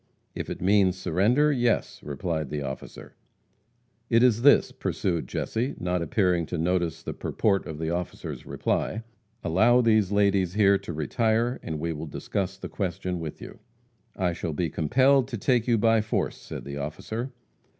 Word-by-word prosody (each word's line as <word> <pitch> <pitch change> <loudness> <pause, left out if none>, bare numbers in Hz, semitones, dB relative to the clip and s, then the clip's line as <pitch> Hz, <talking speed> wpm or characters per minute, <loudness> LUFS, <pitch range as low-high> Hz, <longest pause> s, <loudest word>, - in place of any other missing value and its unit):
"If - - -5
it - - -5
means 95 -1 +4
surrender, 115 - +2
yes," 120 -5 0
replied 75 +1 -3
the 75 -1 -3
officer. 65 0 -8 1.0
"It 115 0 +4
is 115 -3 +4
this:" 145 +3 +5
pursued 85 -4 -2
Jesse, 120 +5 -2
not 90 0 -1
appearing 90 -1 +1
to 90 - -3
notice 85 -1 0
the - - -4
purport 100 -3 0
of 80 - -6
the 80 +1 -2
officer's 90 0 -4
reply, 110 - -2 0.4
"allow 110 +9 +4
these 110 -4 +3
ladies 100 -3 +2
here 100 -2 +5
to - - -7
retire, 110 - 0
and 80 -2 -4
we 85 +1 -2
will 80 +1 -6
discuss 95 +5 -3
the - - -6
question 90 -2 -3
with 80 -2 -6
you." - - -10 0.6
"I 90 -3 0
shall 85 -1 -4
be 80 +1 -1
compelled 130 - +3
to 125 -3 -4
take 120 +2 +1
you 120 -2 +3
by 115 +1 +4
force," 110 - -1
said - - -8
the 70 0 -6
officer. 110 - -4
95 Hz, 165 wpm, -26 LUFS, 85-115 Hz, 1.0 s, this